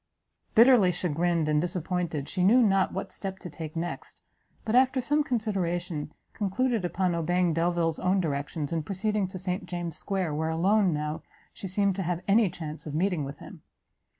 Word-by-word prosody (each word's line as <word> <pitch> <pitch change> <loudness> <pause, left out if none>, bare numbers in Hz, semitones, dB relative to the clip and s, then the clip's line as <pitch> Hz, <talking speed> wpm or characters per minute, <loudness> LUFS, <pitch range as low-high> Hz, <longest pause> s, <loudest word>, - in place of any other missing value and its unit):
Bitterly 230 -5 +7
chagrined 170 -1 0
and 150 0 +2
disappointed, 175 -4 -2
she 185 - -1
knew 240 +7 +6
not 195 -3 +3
what 195 - -5
step 190 0 -5
to 180 - -9
take 160 -1 -7
next; 170 +1 -5 0.5
but, 220 - -1
after 255 +1 +4
some 295 +4 +1
consideration, 180 - -2 0.2
concluded 225 +2 0
upon 180 +1 0
obeying 175 +1 +1
Delvile's 165 -1 0
own 185 +1 +2
directions, 145 -1 -2
and 165 -2 -1
proceeding 205 +2 -1
to 185 +1 -7
St 180 +1 -3
James's 175 -2 -4
square, 190 -6 -2
where 160 +2 -1
alone, 190 +4 +3
now, 150 0 -3 0.3
she 195 - -7
seemed 195 +1 +1
to - - -1
have 175 0 -2
any 205 0 +4
chance 155 -2 -7
of 150 - -5
meeting 175 -2 +1
with 140 +1 -6
him. - - -12
180 Hz, 175 wpm, -28 LUFS, 165-195 Hz, 0.5 s, Bitterly